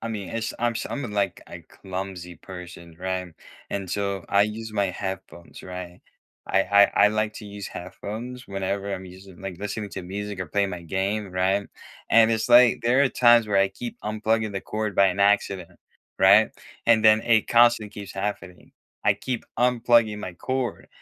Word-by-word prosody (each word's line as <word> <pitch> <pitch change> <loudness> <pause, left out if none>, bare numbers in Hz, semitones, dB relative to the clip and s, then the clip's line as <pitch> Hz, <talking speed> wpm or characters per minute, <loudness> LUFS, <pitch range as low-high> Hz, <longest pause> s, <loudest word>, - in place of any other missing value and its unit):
I - - -5
mean, 105 -4 -5
it's 115 0 -3
I'm 120 0 +1
s - - -3
I'm 140 - -4
a - - -4
like, 100 -3 -1
a - - -9
clumsy 90 -2 -7
person, 90 -3 -11
right? 90 -2 -3 0.3
And 95 -3 -4
so 100 -2 -2
I 100 0 +4
use 110 +1 -4
my 100 -2 +1
headphones, 95 -2 -7
right? 90 -1 -8 0.5
I 95 - +2
I 100 +1 +6 0.2
I - - +4
like 110 0 -1
to 105 - -9
use 100 -1 -7
headphones 120 +8 -7
whenever 100 +1 -3
I'm 95 0 -7
using 95 0 -13
like, 95 -3 -6
listening 105 0 -5
to - - -6
music, 100 +2 -5
or 90 - -3
playing 100 +4 0
my 90 -2 -6
game, 95 +3 -2
right? 95 +2 0 0.4
And 115 0 +6
it's 110 +1 0
like, 120 0 +6
there 125 +4 +3
are 140 - +4
times 120 -3 +5
where 100 - +2
I 100 0 +4
keep 120 +5 -8
unplugging 110 0 -1
the 95 - -3
cord 105 0 -3
by 100 +1 +5
an 90 +1 -3
accident, 100 -3 +1 0.4
right? 100 +3 +6 0.4
And 115 -1 +4
then 110 0 +6
it 115 -2 +2
constantly 120 -3 +4
keeps 100 -1 -9
happening. 95 -2 -5 0.3
I - - +4
keep 125 -3 -4
unplugging 120 -3 +3
my 95 -4 -6
cord, 130 +5 -3
100 Hz, 185 wpm, -25 LUFS, 95-110 Hz, 0.5 s, I